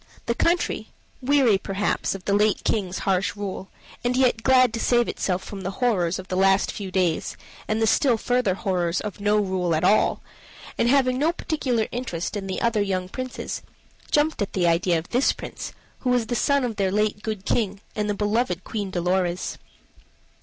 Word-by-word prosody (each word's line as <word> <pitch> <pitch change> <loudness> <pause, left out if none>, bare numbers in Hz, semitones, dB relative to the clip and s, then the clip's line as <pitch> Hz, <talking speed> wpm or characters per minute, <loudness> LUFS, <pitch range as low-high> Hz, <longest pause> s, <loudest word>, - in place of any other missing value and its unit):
The 235 - +1
country, 335 -7 0 0.3
weary 255 -6 +4
perhaps 195 +1 -1
of 185 - -9
the 200 - +1
late 210 +1 +2
King's 190 -4 -1
harsh 195 0 +1
rule, 195 -2 -5 0.3
and 245 +1 +1
yet 250 -3 +3
glad 255 -1 +4
to 230 - -2
save 240 0 +3
itself 185 -1 -1
from 200 -2 -7
the 190 - -3
horrors 190 -9 +1
of 185 - -8
the 185 - -3
last 195 +1 +3
few 200 -2 -6
days, 180 -4 0 0.3
and 215 +1 0
the 225 - +3
still 245 +2 +3
further 245 -5 +1
horrors 180 -4 0
of 210 -1 -6
no 205 +1 +2
rule 185 -4 0
at 155 - -1
all, 215 - +3 0.5
and 235 - +2
having 255 -1 +3
no 315 +4 +3
particular 260 -9 -1
interest 220 -8 -3
in 195 -2 -4
the 190 - -3
other 230 -2 +2
young 185 -2 -1
princes, 255 +4 -5 0.5
jumped 300 -3 +2
at 205 - -2
the 180 -2 +1
idea 170 +1 +3
of 160 - -5
this 250 +3 +3
Prince, - - -7 0.3
who 255 - -2
was 245 -2 +2
the 240 - -2
son 280 +2 +2
of 230 -4 -3
their 195 -2 +1
late 210 0 0
good 215 -3 -4
King 205 -4 0 0.2
and 210 -1 -1
the 205 - 0
beloved 210 -3 0
Queen 205 -3 -4
Dolorez. 180 0 -1
205 Hz, 190 wpm, -24 LUFS, 190-245 Hz, 0.5 s, weary